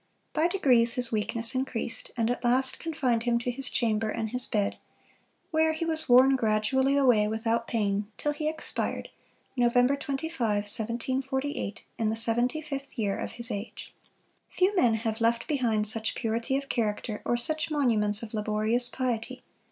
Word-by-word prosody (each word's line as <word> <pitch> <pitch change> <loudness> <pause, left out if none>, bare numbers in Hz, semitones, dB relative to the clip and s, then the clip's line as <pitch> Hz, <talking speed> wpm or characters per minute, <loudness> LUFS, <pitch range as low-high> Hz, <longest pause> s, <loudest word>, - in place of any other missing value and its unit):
By 315 +1 +3
degrees 250 -11 +4
his 250 -2 +1
weakness 225 +2 -1
increased, 255 -3 -3
and 230 0 +1
at 245 - -4
last 255 +2 +1
confined 275 -8 0
him 235 0 +1
to 240 +1 -2
his 265 +2 -5
chamber 220 -2 0
and 220 0 -3
his 250 0 +1
bed; 205 -2 -1 0.7
where 315 0 +3
he 325 +1 -3
was 315 -3 -1
worn 260 +2 +7
gradually 260 +4 +2
away 245 -7 +4
without 225 +2 -1
pain, 205 -2 -1
till 295 - -1
he 305 +1 -2
expired, 315 - -3 0.5
Nov. 240 -1 +2
25, 280 +5 0
1748, 240 +5 -1 0.2
in 220 -1 +1
the 220 - -1
seventy 240 +6 +1
fifth 275 -2 -6
year 205 -3 0
of - - -5
his 235 -1 -3
age. 205 +3 -6 0.6
Few 380 +3 +1
men 245 - +4
have 225 0 -3
left 230 0 +1
behind 235 -8 +1
such 220 +1 -3
purity 230 +3 -1
of 275 0 -5
character, 215 -3 -2
or 240 - 0
such 310 +7 0
monuments 225 -8 +2
of 225 - -8
laborious 215 +3 0
piety. 245 -3 -3
240 Hz, 160 wpm, -28 LUFS, 220-270 Hz, 0.7 s, worn